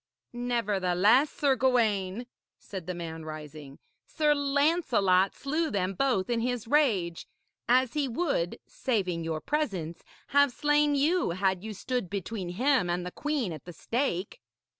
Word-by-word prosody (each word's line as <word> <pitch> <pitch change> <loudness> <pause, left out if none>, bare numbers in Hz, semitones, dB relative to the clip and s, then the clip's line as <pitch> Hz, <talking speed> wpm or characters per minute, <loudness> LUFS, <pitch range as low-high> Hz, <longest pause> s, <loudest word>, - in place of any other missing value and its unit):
'Nevertheless, 225 0 +2
Sir 280 -2 +1
Gawaine,' 230 -5 +1 0.3
said 185 -4 -8
the 180 - -3
man, 165 -2 -6
rising, 150 -2 -9 0.3
'Sir 300 -2 +2
Lancelot 280 - +2
slew 310 +4 -1
them 195 -5 -1
both 220 -3 +1
in 240 -1 0
his 245 -1 -2
rage. 215 - +1 0.4
As 255 0 +3
he 295 -2 0
would 245 - -1
saving 185 -9 -1
your 160 -1 -2
presence 200 - -2 0.3
have 285 -1 +4
slain 295 +2 +2
you 300 - +2
had 190 -1 0
you 220 -1 -6
stood 245 -2 -3
between 200 -1 -4
him 245 +1 +1
and 175 +1 -1
the 180 - -5
queen 285 - -2
at 155 - -10
the 175 - -9
stake.' 215 - -2
225 Hz, 140 wpm, -28 LUFS, 180-275 Hz, 0.4 s, have